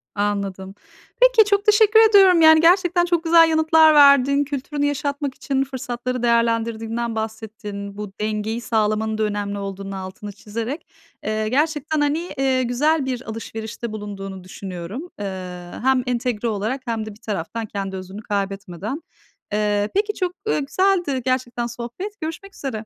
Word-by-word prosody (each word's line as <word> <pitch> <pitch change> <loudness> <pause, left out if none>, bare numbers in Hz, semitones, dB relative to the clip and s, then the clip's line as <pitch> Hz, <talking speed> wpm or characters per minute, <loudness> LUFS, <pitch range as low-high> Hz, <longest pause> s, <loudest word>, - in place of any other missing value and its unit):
Anladım. 200 -2 -2 0.5
Peki - - +6
çok 405 0 +2
teşekkür 425 +1 +6
ediyorum, 380 -5 +6
yani, 315 0 +8
gerçekten 350 0 +4
çok 345 -2 0
güzel 330 0 +6
yanıtlar 315 0 +5
verdin. 280 -1 +6
Kültürünü 285 +1 -3
yaşatmak 285 -1 -2
için 270 -1 -1
fırsatları 250 -2 -4
değerlendirdiğinden 230 0 0
bahsettin. 215 -2 -6
Bu 210 -1 -6
dengeyi 215 +2 -2
sağlamanın 220 -1 0
da 220 - 0
önemli 205 -1 -2
olduğunun 195 0 -6
altını 190 +2 -7
çizerek. 225 - -6 0.4
Eee, 215 0 -1
gerçekten, 300 +3 0
hani, 290 +2 +1 0.2
eee, 265 -1 +2
güzel 280 +5 +1
bir 255 -2 -3
alışverişte 225 +1 -6
bulunduğunu 195 -3 -7
düşünüyorum. 185 - -7
Eee, 180 -3 -6
hem 260 -1 +3
entegre 240 -2 -1
olarak 220 +5 -2
hem 225 -3 -2
de - - -6
bir 210 +3 -16
taraftan 220 +1 -4
kendi 195 -2 -5
özünü 190 +2 -8
kaybetmeden. 200 - -4 0.5
Eee, 210 0 +1
peki 420 +1 +1
çok, 365 -3 -2
eee, 440 - +1
güzeldi 310 -1 +1
gerçekten 245 -2 -1
sohbet. 245 - -7
Görüşmek 330 +6 -6
üzere. 225 -6 -5
235 Hz, 140 wpm, -22 LUFS, 210-295 Hz, 0.5 s, yani